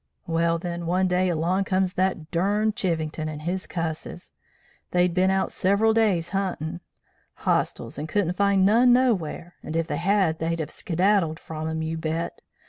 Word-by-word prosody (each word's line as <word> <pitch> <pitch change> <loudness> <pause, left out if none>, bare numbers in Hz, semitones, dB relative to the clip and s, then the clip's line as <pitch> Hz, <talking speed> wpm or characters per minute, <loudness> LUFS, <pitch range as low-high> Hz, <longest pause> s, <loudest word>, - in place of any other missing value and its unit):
Well, 165 0 +1
then, 170 0 -5
one 185 +2 +2
day 180 0 +2
along 175 +4 0
comes 185 -1 +1
that 185 -4 -1
durned 205 +5 +1
Chivington 160 -3 -1
and 150 0 -7
his 185 +3 -3
cusses. 165 -2 -5 0.6
They'd 180 -1 +2
bin 185 +1 +3
out 190 0 +1
several 200 +4 +2
day's 205 -7 +2
huntin' 175 -3 -3 0.5
Hostiles, - - -1
and 155 +2 -5
couldn't 180 -1 +1
find 200 0 +3
none 240 +5 +5
nowhar, 190 -9 +1
and 155 - -6
if 165 0 +1
they - - -3
had, 185 -2 +2
they'd 165 +1 -1
have 155 - -4
skedaddled 175 -2 +1
from 155 0 -6
'em, 160 0 -2
you 160 0 -3
bet! 160 +1 -3
175 Hz, 165 wpm, -25 LUFS, 165-195 Hz, 0.6 s, none